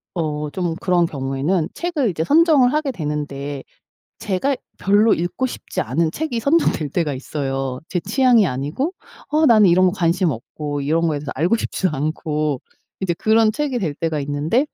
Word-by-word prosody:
어 150 -3 -2
좀 175 0 -2
그런 180 -2 +3
경우에는 145 +4 -1
책을 330 -9 -1
이제 160 -3 -2
선정을 295 - +4
하게 305 -2 0
되는데 145 - -4 0.6
제가 210 +9 0 0.2
별로 205 +3 +4
읽고 175 +10 -2
싶지 255 - -5
않은 165 -1 0
책이 310 -6 -2
선정될 280 - +1
때가 155 -2 0
있어요. 135 -1 -3
제 180 - -1
취향이 235 +1 +3
아니고 150 - -2 0.4
어 310 +1 +3
나는 215 -6 +6
이런 185 +2 +5
거 180 - +2
관심 180 -2 +1
없고 145 +4 -5
이런 160 +4 +1
거에 150 -2 -1
대해서 145 0 -6
알고 170 +10 +2
싶지도 190 -4 -1
않고 150 -1 -2 0.4
이제 185 -3 0
그런 220 +4 +3
책이 265 +1 -2
될 160 -7 -2
때가 160 -1 -2
있는데 145 - 0
170 Hz, 340 characters per minute, -20 LUFS, 150-225 Hz, 0.6 s, 나는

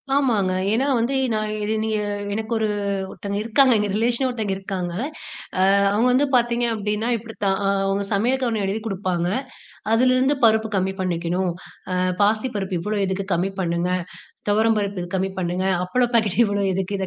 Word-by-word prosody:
ஆமாங்க. 225 -9 +2 0.2
ஏனா, 250 +5 +2
வந்து 235 +4 0 0.2
நான் 215 0 -1
இது 210 +1 0
நீங்க 220 -1 0 0.4
எனக்கு 220 +2 -3
ஒரு 220 -1 +1 0.4
ஒருத்தங்க 200 0 -5
இருக்காங்க. 250 +4 +4
எங்க 210 -1 0
ரிலேஷனே 235 +4 +2
ஒருத்தங்க 220 -5 -2
இருக்காங்க. 190 -3 -4 0.7
ஆ - - +2 0.3
அவங்க 220 +5 +2
வந்து 275 +3 +3
பார்த்தீங்க 240 0 +2
அப்டின்னா 210 +2 -2
இப்டி 225 0 -9
தான். 195 -1 +2
ஆ 195 - +2 0.2
அவங்க 195 +1 0
சமையல் 250 +6 +1
அவுங்க 225 -2 -1
எழுதி 200 +3 -2
குடுப்பாங்க. 185 -4 -1 0.7
அதிலிருந்து 255 +4 +3
பருப்பு 220 0 +4
கம்மி 190 0 0
பண்ணிக்கணும். 175 0 -1 0.4
ஆ - - 0 0.3
பாசிப்பருப்பு 205 -3 0
இவ்வளோ 210 +4 -2
எதுக்கு 190 +1 -2
கம்மி 180 +3 +1
பண்ணுங்க, 170 0 0 0.6
துவரம் 220 +2 +3
பருப்பு 200 -1 -2
இது 175 - -6
கம்மி 190 +1 0
பண்ணுங்க 180 +1 -1 0.2
அப்பள 250 +7 +1
பாக்கெட் 220 -4 +2
இவ்வளோ 205 -1 0
எதுக்கு? 190 +1 -2
இத 190 - -2
210 Hz, 165 wpm, -22 LUFS, 190-230 Hz, 0.7 s, இருக்காங்க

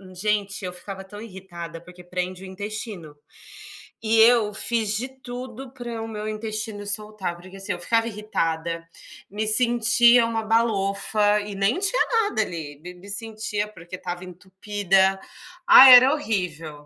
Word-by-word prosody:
gente 200 0 -2
eu 180 - -4
ficava 195 +1 -9
tão 205 +2 -11
irritada, 175 -5 -9
porque 180 0 -14
prende 180 +1 -5
o - - -8
intestino. 200 -4 -7 0.9
E 225 0 +2
eu 225 -3 +5
fiz 220 -1 0
de 245 +5 0
tudo 250 +1 -8
para 240 -3 -6
o - - -6
meu 215 -1 -6
intestino 215 -1 -5
soltar, 205 -3 -4
porque, 185 +2 -14
assim, 195 - -5
eu 175 - -7
ficava 225 +5 +1
irritada, 165 -6 -3 0.4
me 215 +2 -3
sentia 235 +1 +5
uma 225 -1 -2
balofa 210 -1 +1
e 205 -1 -7
nem 200 - +1
tinha 395 +6 +2 0.2
nada 315 - 0
ali, 155 -7 -7
me 180 +3 -10
me 180 +3 -15
sentia, 210 0 -3
porque 175 -3 -11
estava 180 0 -6
entupida, 190 +1 0 0.5
ah, 270 -6 +10
era 255 +3 +9
horrível, 165 - -4
205 Hz, 150 wpm, -23 LUFS, 185-225 Hz, 0.9 s, ah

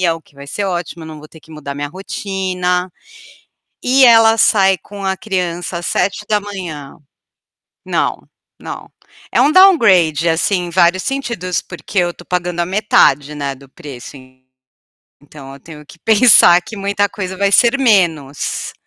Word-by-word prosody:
o 165 - -12
que 145 - -28
vai 140 0 -12
ser 200 +7 -4
ótimo, 175 -2 -5
eu - - -10
não 155 -1 -10
vou 155 - -13
ter 160 - -17
que 160 - -19
mudar 140 -2 -8
minha 145 0 -4
rotina 185 0 -3 0.9
e 260 +1 +4
ela 225 -2 +6
sai 195 -4 +3
com 200 +2 -11
a 190 0 -1
criança 180 -3 -4
às 175 - -6
7h. 200 -8 -3 0.9
Não, - - -2 0.3
não, - - -9 0.4
é - - +2
um 295 - +3
downgrade, 190 - +4
assim, 180 +3 0
em 175 - -7
vários 175 +1 +2
sentidos, 235 -10 -3
porque 175 +3 -5
eu 175 -1 0
estou 175 - -16
pagando 180 -1 -3
a - - -1
metade, 170 -7 +2
né, 140 -2 -4
do 135 +1 -17
preço 140 -4 -11 1.1
então 140 -2 -13
eu 140 - -13
tenho 150 +1 -13
que 170 - -17
pensar 215 -4 +6
que 220 - -10
muita 200 0 -1
coisa 190 -2 -6
vai 200 0 +1
ser 240 +5 +4
menos. 170 - 0
180 Hz, 160 wpm, -16 LUFS, 160-205 Hz, 1.1 s, ela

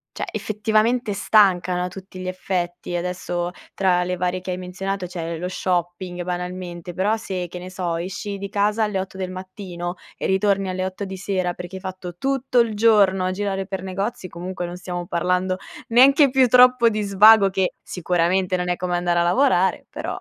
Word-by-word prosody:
cioè - - -3
effettivamente 215 +2 0
stancano 185 -4 +3
a - - -2
tutti 190 +1 -10
gli 185 - -5
effetti. 180 -1 -3
Adesso, 175 0 -2 0.2
tra 180 -2 +2
le 180 +1 -2
varie 180 +1 -1
che 185 - -5
hai 180 - -3
menzionato 185 +1 -4
c'è 170 -2 -5
lo 180 - -3
shopping 180 0 -2
banalmente, 180 -1 -5
però 205 +5 +1
se, 185 -5 -4
che 175 - -8
ne 180 +1 -8
so, 180 -3 -2
esci 195 +4 -4
di 200 0 -5
casa 210 +2 +1
alle 210 -3 -1
8 190 0 -6
del 185 -1 -4
mattino 185 -1 -6 0.2
e - - -3
ritorni 195 0 +1
alle 185 0 -2
8 190 +2 -5
di 190 0 -6
sera 185 -2 -1
perché 180 +1 -7
hai - - -10
fatto 185 -2 -7
tutto 265 -1 0
il 230 -2 +2
giorno 205 -4 +4
a 185 - 0
girare 195 0 -2
per 190 -1 -5
negozi, 195 +1 -4
comunque 180 +1 -5
non 175 - -7
stiamo 175 -1 -5
parlando 180 +2 0 0.3
neanche 275 +4 +6
più 260 0 +4
troppo 250 -1 +6
di 215 -1 -2
svago 200 +1 +6
che, 190 -1 0
sicuramente 180 +1 0
non 180 0 -2
è 175 - +1
come 180 0 -2
andare 175 0 +1
a - - +3
lavorare, 190 -1 +2
però. - - -5
185 Hz, 190 wpm, -22 LUFS, 180-200 Hz, 0.3 s, neanche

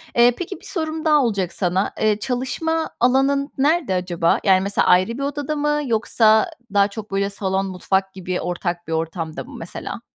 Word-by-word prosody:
Eee, 240 0 +6
peki, 360 +2 -5
bir - - -13
sorum 320 -3 -3
daha 300 -2 +4
olacak 200 -7 -1
sana. 185 +1 0
Eee, 215 -1 +2
çalışma 270 +7 -2
alanın 270 +3 +2
nerede 290 - +2
acaba? 175 -2 +1
Yani, 190 -2 +4
mesela, 200 +1 0
ayrı 185 +5 +4
bir 275 - -3
odada 290 +1 -2
mı, 295 0 0
yoksa 220 -2 +3 0.2
daha 200 0 +4
çok, 210 0 -9
böyle, 195 0 0
salon, 195 -1 -1
mutfak 190 +1 -1
gibi 185 -1 -4
ortak 175 -1 -3
bir 165 - -3
ortamda 160 0 -3
mı, - - -12
mesela? - - -7
215 Hz, 175 wpm, -21 LUFS, 185-280 Hz, 0.2 s, Eee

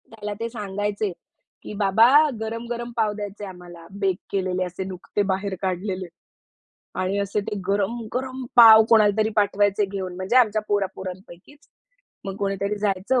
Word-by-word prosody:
त्याला 210 -2 -6
ते 230 0 -3
सांगायचे. 205 -2 -3 0.5
की - - -8
बाबा 205 +3 +5 0.3
गरम-गरम 235 +2 -5
पाव 220 -2 +2
द्यायचंय 205 0 -7
आम्हाला 175 -2 -12
बेक 190 -2 +1
केलेले 185 -1 -1
असे 180 +1 -6
नुकते 185 +2 -4
बाहेर 190 0 -2
काढलेले. 185 0 -3 0.9
आणि 185 +2 -1
असे 200 +1 -1
ते 205 +1 -5
गरम-गरम 235 +6 -2
पाव 225 -2 +10
कोणालातरी 215 -1 +4
पाठवायचे 205 0 +2
घेऊन 190 -2 -5
म्हणजे 185 +6 -1
आमच्या 220 -4 +4
पोरा 205 -1 +1
पोरांपैकीच. 190 - -10 0.6
मग 195 -1 -5
कोणीतरी 200 +1 -2
जायचं 205 +5 0
205 Hz, 135 wpm, -23 LUFS, 190-220 Hz, 0.9 s, पाव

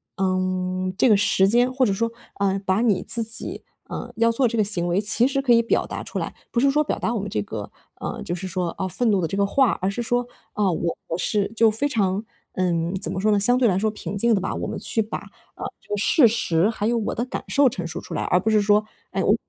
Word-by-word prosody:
嗯， 185 0 -1
这 255 - +4
个 210 - +6
时 195 -1 +3
间 245 +3 +3
或 260 -1 +3
者 205 - +1
说， 230 +4 0 0.3
呃， 195 -1 +1
把 190 +2 +2
你 205 -6 +2
自 230 -1 -3
己， 225 +1 -7 0.3
呃， 240 - -6
要 230 0 +3
做 245 +2 +2
这 230 - -2
个 215 - +4
行 180 -4 +1
为， 175 +3 +1
其 225 +3 +3
实 275 0 0
可 265 -3 +1
以 235 0 +6
表 230 - +1
达 - - -5
出 - - -6
来， - - -3 0.2
不 240 - +1
是 275 0 +4
说 300 - +2
表 300 - -1
达 230 - -1
我 230 - -1
们 205 +1 -4
这 105 - -1
个， 105 0 -6 0.3
呃， - - -5
就 175 - -3
是 185 +2 -4
说， 180 -1 -2
哦， 190 - -2
愤 225 +5 +1
怒 200 - +2
的 170 - 0
这 195 - -4
个 200 0 +2
话， 255 +2 +2
而 190 +1 0
是 220 - -3
说 245 +1 0 0.3
啊， 210 - -1
呃， 185 - +2
我 170 0 -1 0.2
是 205 +2 0
就 225 0 +5
非 225 +7 0
常 205 -5 0 0.3
嗯， 175 0 0
怎 170 -3 -1
么 185 - -3
说 215 - +3
呢， 205 - +3
相 245 +5 +5
对 255 -2 +3
来 185 -4 +2
说 215 +2 +1
平 210 -1 -6
静 235 +3 +3
的 195 - +1
吧， 190 - -2
我 - - -3
们 - - -4
去 225 - -2
把， 220 0 -1 0.4
呃， - - -8 0.2
这 - - -27
个 205 - 0
事 240 +5 +5
实 205 -6 +1
还 215 -1 -2
有 235 0 +1
我 220 - -2
的 235 - -2
感 255 - -5
受 280 -2 +4
陈 180 -7 -5
述 165 - -5
出 - - -8
来， - - -1
而 180 - +2
不 220 - -1
是 215 -1 +4
说， 210 +1 +4 0.3
哎， - - -1
我 - - +4
205 Hz, 295 characters per minute, -23 LUFS, 185-235 Hz, 0.4 s, 个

